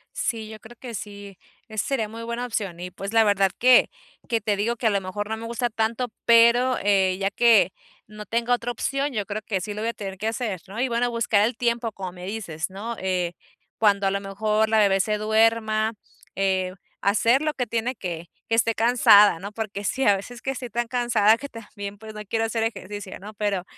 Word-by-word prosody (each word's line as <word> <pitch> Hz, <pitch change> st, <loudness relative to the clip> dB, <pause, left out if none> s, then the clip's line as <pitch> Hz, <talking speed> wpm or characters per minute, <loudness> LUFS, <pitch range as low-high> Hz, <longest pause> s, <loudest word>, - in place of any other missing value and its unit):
Sí, 225 Hz, -2 st, -2 dB
yo 220 Hz, 0 st, -10 dB
creo 230 Hz, +3 st, -14 dB
que 245 Hz, -3 st, -8 dB
sí, 200 Hz, -2 st, -8 dB, 0.3 s
esa 215 Hz, -2 st, -2 dB
sería 250 Hz, -6 st, 0 dB
muy 225 Hz, +2 st, -9 dB
buena 235 Hz, +1 st, -3 dB
opción 200 Hz, -7 st, -3 dB
y, 180 Hz, +1 st, -6 dB
pues, 195 Hz, +3 st, -6 dB
la 225 Hz, 0 st, +6 dB
verdad 200 Hz, -2 st, +3 dB
que 255 Hz, 0 st, +6 dB, 0.4 s
que 230 Hz, -2 st, +1 dB
te 210 Hz, 0 st, 0 dB
digo 220 Hz, +4 st, 0 dB
que 240 Hz, -, -7 dB
a -, -, +6 dB
lo 200 Hz, -1 st, +1 dB
mejor 205 Hz, +2 st, -4 dB
no 220 Hz, +1 st, -3 dB
me 230 Hz, -, -7 dB
gusta 235 Hz, +1 st, -2 dB
tanto, 225 Hz, +3 st, -1 dB, 0.2 s
pero, 235 Hz, +2 st, +5 dB
eh, 190 Hz, -2 st, +3 dB
ya 195 Hz, 0 st, 0 dB
que, 235 Hz, -1 st, +4 dB, 0.3 s
no 210 Hz, 0 st, -10 dB
tengo 235 Hz, +1 st, 0 dB
otra 245 Hz, 0 st, -1 dB
opción, 275 Hz, +4 st, -2 dB
yo 210 Hz, -3 st, -2 dB
creo 210 Hz, +2 st, -4 dB
que 200 Hz, -2 st, -2 dB
sí 205 Hz, +3 st, -5 dB
lo 210 Hz, -, -5 dB
voy 230 Hz, -, -1 dB
a 235 Hz, -, -3 dB
tener 195 Hz, -2 st, -7 dB
que 215 Hz, -, -2 dB
hacer, 220 Hz, -5 st, -3 dB
¿no?, 200 Hz, +4 st, -7 dB
y 260 Hz, -, +2 dB
bueno, 240 Hz, +1 st, 0 dB
buscar 230 Hz, -3 st, +2 dB
el 235 Hz, -1 st, -5 dB
tiempo, 235 Hz, -1 st, 0 dB
como 190 Hz, -3 st, -6 dB
me 180 Hz, 0 st, -9 dB
dices, 190 Hz, -7 st, -4 dB
¿no?, 210 Hz, +5 st, -6 dB
eh, 180 Hz, -2 st, -1 dB, 0.5 s
cuando 200 Hz, -2 st, +3 dB
a 195 Hz, -, +2 dB
lo 200 Hz, 0 st, -1 dB
mejor 215 Hz, +2 st, 0 dB
la 220 Hz, -, +3 dB
bebé 195 Hz, -2 st, +4 dB
se 210 Hz, +2 st, +1 dB
duerma, 220 Hz, 0 st, +2 dB, 0.4 s
eh, 190 Hz, -1 st, 0 dB, 0.3 s
hacer 230 Hz, +6 st, +3 dB
lo 305 Hz, -1 st, 0 dB
que 250 Hz, -, -1 dB
tiene 235 Hz, +3 st, -2 dB
que 175 Hz, -4 st, -6 dB, 0.2 s
que -, -, -3 dB
esté 230 Hz, 0 st, +2 dB
cansada, 210 Hz, -5 st, +6 dB
¿no?, 200 Hz, +3 st, -7 dB
porque 210 Hz, -2 st, -5 dB
sí 260 Hz, +6 st, -1 dB
a 205 Hz, -, +6 dB
veces 240 Hz, +5 st, -8 dB
que 270 Hz, -, -1 dB
estoy 255 Hz, -2 st, -6 dB
tan 235 Hz, +2 st, -2 dB
cansada 230 Hz, -3 st, +3 dB
que 280 Hz, +2 st, -8 dB
también, 205 Hz, -3 st, -8 dB
pues, 220 Hz, +1 st, -10 dB
no 210 Hz, -, -7 dB
quiero 225 Hz, +2 st, -1 dB
hacer 225 Hz, 0 st, -2 dB
ejercicio, 205 Hz, -3 st, -5 dB
¿no?, 210 Hz, +3 st, -10 dB
pero, 205 Hz, -3 st, -1 dB
215 Hz, 225 wpm, -24 LUFS, 200-235 Hz, 0.5 s, la